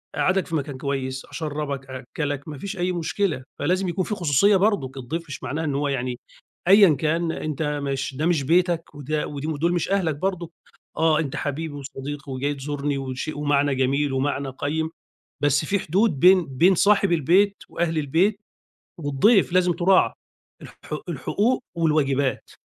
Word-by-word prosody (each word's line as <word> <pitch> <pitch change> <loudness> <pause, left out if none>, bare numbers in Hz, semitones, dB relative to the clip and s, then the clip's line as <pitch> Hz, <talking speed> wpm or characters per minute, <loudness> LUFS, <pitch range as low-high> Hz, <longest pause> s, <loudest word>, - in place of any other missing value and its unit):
أقعّدك 185 0 +1
في 165 - -3
مكان 140 -2 -3
كويس، 135 -1 -3
أشرّبك، 145 -3 -4
أأكّلك، 140 +3 -4
ما 150 - -7
فيش 200 +6 -6
أي 180 +1 0
مشكلة، 170 -4 -1 0.2
فلازم 180 +5 0
يكون 180 +2 -1
في 210 - -2
خصوصية 180 +4 +3
برضك، 165 -10 0
الضيف 155 +7 -4
مش 145 - -8
معناه 155 +3 -3
إن 145 -3 -1
هو 145 +1 0
يعني 125 -2 -2 0.5
أيًا 195 -5 +7
كان 165 +2 0
أنت 155 -1 -3 0.2
مش 135 -1 -3
ده 150 +4 -1
مش 165 -5 +2
بيتك 170 +1 +1
وده 150 +2 -2
ودي 145 +1 -5
ودول 160 +3 0
مش 175 - -1
أهلك 175 -6 +1
برضه، 175 +1 -3 0.5
آه 160 -1 +3
أنت 145 -4 -3
حبيبي 150 +2 -3
وصديقي 140 0 -7
وجاي 140 +3 -1
تزورني 140 0 -3
وشيء 130 +3 -5
ومعنى 145 -1 +2
جميل 135 +2 +1
ومعنى 135 0 -1
قيّم، 155 +4 -2 0.5
بس 145 +1 +3
في 200 +6 0
حدود 185 -3 +1
بين 180 -1 +6
بين 165 +9 +3
صاحب 200 0 +3
البيت 185 +6 +3
وأهل 165 -2 -1
البيت 175 +9 +1 0.6
والضيف 170 - +3
لازم 180 -1 +4
تُراعى، 185 +3 +3 0.5
الح - - -11 0.4
الحقوق 245 +5 0
والواجبات. 140 -5 +1
155 Hz, 160 wpm, -24 LUFS, 140-175 Hz, 0.6 s, أيًا